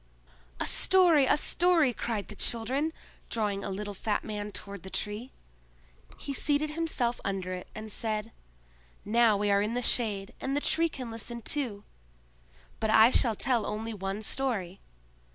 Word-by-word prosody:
"A -, -, 0 dB
story! 345 Hz, -7 st, +4 dB
a -, -, +4 dB
story!" 330 Hz, -4 st, +3 dB
cried 220 Hz, -3 st, -3 dB
the 210 Hz, -, -8 dB
children, 255 Hz, +9 st, -1 dB, 0.4 s
drawing 205 Hz, -3 st, -1 dB
a -, -, -3 dB
little 205 Hz, +1 st, -4 dB
fat 205 Hz, +2 st, -1 dB
man 210 Hz, -1 st, -5 dB
toward 200 Hz, -1 st, -7 dB
the 190 Hz, -, -9 dB
Tree. 210 Hz, +6 st, -3 dB, 0.9 s
He 280 Hz, -, -5 dB
seated 290 Hz, +2 st, +1 dB
himself 300 Hz, -7 st, -1 dB
under 190 Hz, -2 st, -2 dB
it, 180 Hz, -, -6 dB
and 215 Hz, 0 st, -6 dB
said: 215 Hz, 0 st, -1 dB, 0.7 s
"Now 225 Hz, 0 st, +4 dB
we 205 Hz, 0 st, +1 dB
are 200 Hz, 0 st, +4 dB
in 215 Hz, +3 st, -1 dB
the 245 Hz, -, 0 dB
shade, 205 Hz, -5 st, +1 dB
and 270 Hz, +1 st, -1 dB
the -, -, +3 dB
Tree 330 Hz, +3 st, +2 dB
can 255 Hz, -6 st, -7 dB
listen 235 Hz, +1 st, -4 dB
too. 235 Hz, -4 st, -2 dB, 1.0 s
But 220 Hz, -, 0 dB
I 220 Hz, +2 st, +7 dB
shall 230 Hz, -4 st, +2 dB
tell 240 Hz, -1 st, +2 dB
only 220 Hz, +2 st, -3 dB
one 195 Hz, +1 st, -4 dB
story. 210 Hz, -9 st, -2 dB
225 Hz, 160 wpm, -29 LUFS, 205-265 Hz, 1.0 s, I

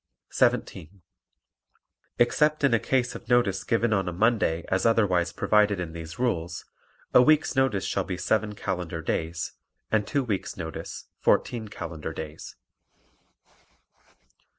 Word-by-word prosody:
17. 90 Hz, +3 st, 0 dB, 1.1 s
Except 150 Hz, +5 st, +2 dB
in 140 Hz, -4 st, +4 dB
a 115 Hz, -, +4 dB
case 125 Hz, 0 st, 0 dB
of -, -, -10 dB
notice 100 Hz, -6 st, +2 dB
given 115 Hz, 0 st, +1 dB
on 90 Hz, -4 st, -1 dB
Monday 105 Hz, -6 st, +2 dB
as 95 Hz, -, 0 dB
otherwise 95 Hz, -7 st, +2 dB
provided 105 Hz, -2 st, +2 dB
in 85 Hz, -2 st, -4 dB
these 80 Hz, +3 st, -8 dB
rules, 90 Hz, -9 st, -2 dB, 0.5 s
a -, -, +8 dB
week's 155 Hz, +2 st, +3 dB
notice 130 Hz, -8 st, +1 dB
shall 100 Hz, -, 0 dB
be 90 Hz, -1 st, -4 dB
seven 105 Hz, +3 st, 0 dB
calendar 90 Hz, -5 st, -4 dB
days 80 Hz, +2 st, -2 dB, 0.4 s
and 105 Hz, -1 st, +1 dB
two 140 Hz, -3 st, 0 dB
weeks' 105 Hz, -6 st, -3 dB
notice 80 Hz, -4 st, -6 dB
fourteen 115 Hz, -3 st, +1 dB
calendar 80 Hz, -5 st, -6 dB
days. 80 Hz, 0 st, -8 dB
100 Hz, 130 wpm, -26 LUFS, 85-120 Hz, 1.1 s, a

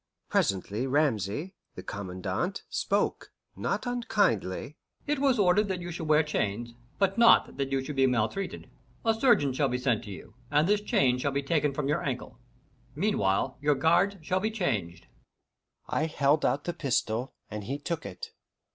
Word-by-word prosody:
Presently 100 Hz, +6 st, 0 dB
Ramesay, 140 Hz, -, 0 dB, 0.2 s
the -, -, -8 dB
Commandant, 95 Hz, -, -4 dB
spoke, -, -, -1 dB, 0.2 s
not -, -, -2 dB
unkindly: 190 Hz, -, 0 dB, 0.3 s
"It 295 Hz, -1 st, 0 dB
was 270 Hz, -3 st, +3 dB
ordered 200 Hz, +1 st, +3 dB
you 175 Hz, 0 st, -6 dB
should 165 Hz, -1 st, -5 dB
wear 155 Hz, +1 st, +5 dB
chains, 120 Hz, -5 st, -2 dB, 0.2 s
but 195 Hz, +2 st, +1 dB
not 235 Hz, -, +5 dB
that 135 Hz, -1 st, -2 dB
you 135 Hz, -1 st, 0 dB
should 150 Hz, +1 st, -6 dB
be 135 Hz, -1 st, +4 dB
maltreated. 125 Hz, -, -1 dB, 0.4 s
A 225 Hz, -, +4 dB
surgeon 220 Hz, -, +3 dB
shall 140 Hz, +2 st, +1 dB
be 125 Hz, -, -1 dB
sent 125 Hz, -3 st, 0 dB
to -, -, -9 dB
you, 95 Hz, -, -10 dB, 0.2 s
and 150 Hz, +3 st, +3 dB
this 205 Hz, +1 st, +3 dB
chain 125 Hz, -10 st, +2 dB
shall 140 Hz, +2 st, 0 dB
be 140 Hz, +1 st, -1 dB
taken 150 Hz, 0 st, +1 dB
from 140 Hz, 0 st, -2 dB
your 150 Hz, -, +1 dB
ankle. 125 Hz, -3 st, -4 dB, 0.6 s
Meanwhile, 130 Hz, -, 0 dB
your 145 Hz, 0 st, +3 dB
guards 165 Hz, +8 st, +3 dB
shall 185 Hz, +4 st, 0 dB
be 215 Hz, +3 st, 0 dB
changed." 120 Hz, -, -2 dB, 0.8 s
I 155 Hz, -, 0 dB
held 150 Hz, -1 st, +2 dB
out 145 Hz, -, +1 dB
the 175 Hz, -, -3 dB
pistol, 125 Hz, -4 st, -1 dB, 0.2 s
and 105 Hz, -1 st, -5 dB
he 135 Hz, +5 st, -3 dB
took 165 Hz, +2 st, -4 dB
it. 90 Hz, -, -8 dB
145 Hz, 165 wpm, -28 LUFS, 120-180 Hz, 0.8 s, wear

